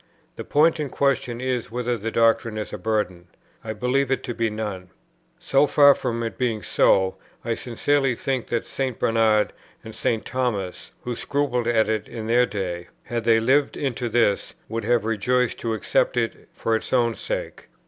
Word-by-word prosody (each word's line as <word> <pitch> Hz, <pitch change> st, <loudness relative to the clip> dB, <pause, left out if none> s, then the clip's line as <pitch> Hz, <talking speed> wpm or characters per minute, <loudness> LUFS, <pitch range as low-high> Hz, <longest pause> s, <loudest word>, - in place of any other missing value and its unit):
The -, -, -6 dB
point 160 Hz, +3 st, +3 dB
in 150 Hz, -2 st, -2 dB
question 130 Hz, -3 st, 0 dB
is, 125 Hz, -2 st, -2 dB
whether 120 Hz, +1 st, -1 dB
the 115 Hz, 0 st, -4 dB
doctrine 115 Hz, -1 st, +2 dB
is 105 Hz, -, -5 dB
a -, -, -5 dB
burden. 95 Hz, -6 st, -2 dB, 0.4 s
I 110 Hz, -, -4 dB
believe 125 Hz, +5 st, 0 dB
it 135 Hz, -, 0 dB
to 120 Hz, -, -4 dB
be 115 Hz, -1 st, 0 dB
none. 105 Hz, -4 st, -5 dB, 0.5 s
So 140 Hz, +2 st, +2 dB
far 145 Hz, -1 st, +7 dB
from 115 Hz, -3 st, -3 dB
it 115 Hz, -, -5 dB
being 115 Hz, -4 st, 0 dB
so, 95 Hz, -1 st, +3 dB, 0.3 s
I 120 Hz, -, 0 dB
sincerely 135 Hz, +3 st, 0 dB
think 130 Hz, 0 st, -2 dB
that 120 Hz, -1 st, -1 dB
St. 130 Hz, -4 st, -3 dB
Bernard 110 Hz, -2 st, +2 dB, 0.3 s
and 110 Hz, -, -9 dB
St. 115 Hz, 0 st, -1 dB
Thomas, 110 Hz, -8 st, -3 dB
who 120 Hz, -1 st, -3 dB
scrupled 130 Hz, -3 st, -1 dB
at 115 Hz, -2 st, +3 dB
it 110 Hz, -1 st, -1 dB
in 115 Hz, -2 st, -6 dB
their 120 Hz, +2 st, +3 dB
day, 90 Hz, -4 st, -4 dB, 0.2 s
had 120 Hz, -1 st, -4 dB
they 115 Hz, -1 st, +5 dB
lived 135 Hz, +5 st, +2 dB
into 125 Hz, -4 st, -2 dB
this, 110 Hz, -3 st, +1 dB
would 115 Hz, -1 st, -4 dB
have 120 Hz, -1 st, +2 dB
rejoiced 125 Hz, +3 st, +1 dB
to 115 Hz, -1 st, -1 dB
accept 110 Hz, -, +1 dB
it -, -, -2 dB
for 115 Hz, -, -1 dB
its 110 Hz, -, -4 dB
own 120 Hz, -2 st, +3 dB
sake. -, -, -5 dB
115 Hz, 180 wpm, -24 LUFS, 110-125 Hz, 0.5 s, far